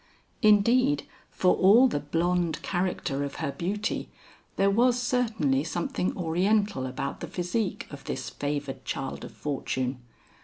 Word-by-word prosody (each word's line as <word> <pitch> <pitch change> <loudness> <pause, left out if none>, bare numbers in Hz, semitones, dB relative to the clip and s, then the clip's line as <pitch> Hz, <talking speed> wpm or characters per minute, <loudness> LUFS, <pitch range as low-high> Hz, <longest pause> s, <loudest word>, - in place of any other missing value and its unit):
Indeed 240 +6 +4 0.2
for 180 - +3
all 220 +8 +6
the 190 - -1
blonde 170 +2 0
character 175 -6 -1
of 140 - -5
her 155 -4 -2
beauty, 205 +8 -2 0.5
there 195 0 +3
was 245 +4 +3
certainly 225 - +1
something 175 +2 -2
oriental 185 -2 +1
about 130 +2 -4
the - - -5
physique 185 +3 -2
of 140 -1 -10
this - - -4
favored 145 -2 -4
child 135 -1 -4
of - - -8
fortune. 130 -3 -3
180 Hz, 130 wpm, -27 LUFS, 145-210 Hz, 0.5 s, all